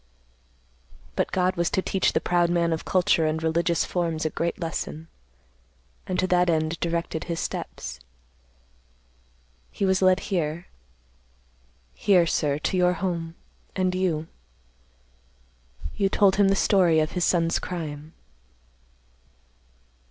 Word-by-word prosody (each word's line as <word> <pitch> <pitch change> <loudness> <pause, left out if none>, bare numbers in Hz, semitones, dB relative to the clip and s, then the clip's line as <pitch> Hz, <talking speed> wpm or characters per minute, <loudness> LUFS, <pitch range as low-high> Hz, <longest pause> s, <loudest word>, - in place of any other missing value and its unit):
"But - - 0
God 185 0 +1
was 170 -1 0
to 190 - 0
teach 190 - +1
the - - +2
proud 175 -1 +1
man 170 -1 +1
of 160 - -4
culture 185 -3 +2
and 160 +1 -2
religious 170 +1 +1
forms 165 -3 -2
a 155 - 0
great 170 +3 -2
lesson, 165 -1 -5 1.0
and 185 - -2
to 185 - +2
that 180 -1 +2
end 160 0 0
directed 170 -1 -2
his 170 -1 -3
steps. 65 +1 -5 1.7
He 200 - -2
was 190 0 +2
led 185 0 +4
here, 170 -3 -2 1.3
here, 185 -4 +3
sir, 145 -3 0
to 155 - -2
your 180 0 +3
home, 170 -2 -3 0.4
and 185 -1 +1
you—you 175 -4 -1 1.8
told 195 -1 +3
him 200 -1 +5
the 195 - +3
story 180 -5 +3
of 155 0 0
his 180 - -1
son's 165 -2 +2
crime." 155 -3 -6
170 Hz, 125 wpm, -25 LUFS, 160-185 Hz, 1.8 s, him